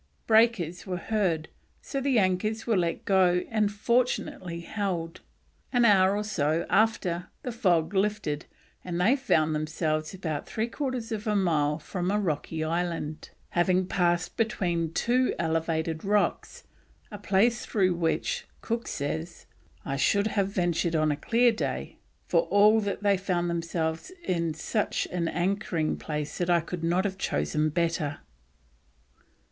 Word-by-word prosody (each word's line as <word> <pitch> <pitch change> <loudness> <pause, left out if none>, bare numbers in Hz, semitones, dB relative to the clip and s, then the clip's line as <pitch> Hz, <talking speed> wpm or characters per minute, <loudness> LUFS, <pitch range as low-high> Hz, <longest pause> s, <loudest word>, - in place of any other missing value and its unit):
Breakers 220 -7 +2
were 180 -1 -2
heard, 175 -5 0 0.3
so 275 - -4
the 265 -2 +2
anchors 210 +3 +1
were 230 - +2
let 170 -3 -1
go 180 -2 +3
and 215 -2 +2
fortunately 205 -6 -1
held. 175 -4 -3 0.5
An 245 -2 +4
hour 195 -2 +5
or 210 - -1
so 160 -5 0
after 190 -5 +1 0.2
the 250 - -3
fog 180 -7 +1
lifted, 195 -7 -1 0.4
and 175 -1 -3
they 215 +9 +4
found 160 - +2
themselves 155 0 -1
about 160 -6 -4
three 220 - -1
quarters 250 -2 -4
of 220 0 -4
a 210 - +1
mile 155 -6 +2
from 180 +3 -3
a 205 +1 +1
rocky 160 -3 -2
island, 165 -2 -3 0.2
having 180 +1 +2
passed 175 -2 0
between 175 -8 0
two 250 +8 +1
elevated 160 -1 -1
rocks, 210 - 0 0.5
a 205 - -7
place 205 +5 +2
through 185 -4 +1
with, 175 - -1
Cook 230 0 -3
says, 160 +4 -4 0.4
"I 135 -1 -2
should 200 +8 +2
have 200 -2 +2
ventured 175 -3 0
on 155 -1 +2
a - - 0
clear 235 +10 +3
day," 225 - -4 0.3
for - - +2
all 210 +2 +5
that 205 -1 -3
they 200 -1 +4
found 175 -2 -1
themselves 165 - -2
in 170 - -1
"such 210 +6 -1
an 175 -2 -1
anchoring 175 -2 -1
place 150 -1 -4
that 175 0 0
I 170 -1 +4
could 170 +1 -6
not 175 +3 +1
have 190 -1 -3
chosen 150 - 0
a - - 0
better." 160 -2 -1
180 Hz, 150 wpm, -27 LUFS, 165-210 Hz, 0.5 s, hour